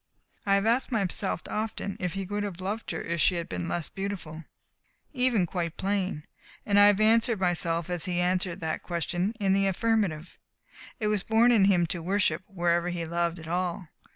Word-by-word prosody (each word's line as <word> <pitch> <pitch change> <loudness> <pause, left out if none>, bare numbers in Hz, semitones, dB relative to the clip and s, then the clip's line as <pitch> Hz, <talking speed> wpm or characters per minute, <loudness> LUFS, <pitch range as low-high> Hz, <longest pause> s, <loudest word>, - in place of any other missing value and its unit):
I 195 - +5
have 200 +1 +1
asked 240 +4 +2
myself 195 -6 -1
often 210 -2 -3
if 180 -2 -2
he 195 0 -3
would 205 +2 -3
have 200 -4 -4
loved 205 +5 -4
her - - -3
if 170 -1 -2
she 180 - +4
had 170 -1 -3
been 90 -1 -4
less 170 -3 -2
beautiful 180 -5 -6 0.7
even 250 -8 +2
quite 170 -2 -3
plain, 190 -5 -1 0.4
and 205 -1 +3
I 205 - +8
have 205 -1 +4
answered 225 0 +4
myself 170 -2 0
as 175 -3 -2
he 175 -1 -1
answered 180 0 0
that 160 -1 -2
question, 175 +4 -2
in 195 -2 +2
the 195 0 +2
affirmative. 195 -5 -1 0.6
It 215 - -2
was 210 -2 +1
born 225 +4 +4
in 215 -5 +5
him 180 -3 +4
to 170 +1 -4
worship 180 -2 +1
wherever 175 -2 0
he 175 -1 -3
loved 170 +1 -1
at 160 -1 -10
all. 175 0 -2
185 Hz, 190 wpm, -28 LUFS, 170-205 Hz, 0.7 s, I